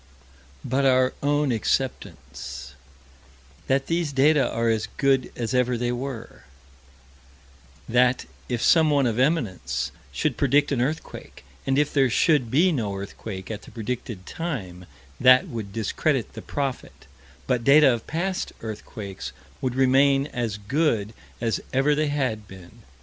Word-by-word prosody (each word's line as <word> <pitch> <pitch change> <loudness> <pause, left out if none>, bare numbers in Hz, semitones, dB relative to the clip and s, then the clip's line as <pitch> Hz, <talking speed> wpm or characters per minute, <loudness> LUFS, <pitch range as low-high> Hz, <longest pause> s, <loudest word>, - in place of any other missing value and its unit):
But 135 +3 0
our 130 -1 +4
own 145 -1 +1
acceptance: 70 - -3 0.9
That 135 +1 +2
these 165 -2 -1
data 140 +1 +4
are 115 0 0
as 110 -1 +1
good 135 -2 +2
as 120 +1 -3
ever 125 -1 +2
they 120 +1 -1
were; 125 - -6 1.4
That, 125 +1 +3 0.2
if 120 -2 -1
someone 150 -4 +4
of 120 -1 0
eminence 95 - 0 0.2
should 65 - -1
predict 145 +2 +3
an 130 -4 +1
earthquake, 150 - -5 0.2
and 135 0 +2
if 145 0 +1
there 135 -3 +4
should 135 0 +3
be 165 +10 +4
no 110 -10 -2
earthquake 100 0 -7
at 105 -1 -5
the - - -14
predicted 115 -4 -5
time, 100 - -5 0.3
that 130 0 +6
would 110 -4 -6
discredit 115 +5 -1
the - - -8
prophet, 135 - -4 0.4
but 125 -2 0
data 140 0 +6
of 115 - -5
past 180 +4 -2
earthquakes 105 - -7 0.3
would 125 -2 -1
remain 135 +1 +4
as 115 -4 -2
good 110 -1 0 0.3
as 115 -1 -1
ever 135 +3 +3
they 150 +1 +1
had 130 -8 -2
been. 95 +4 -14
125 Hz, 140 wpm, -24 LUFS, 110-140 Hz, 1.4 s, that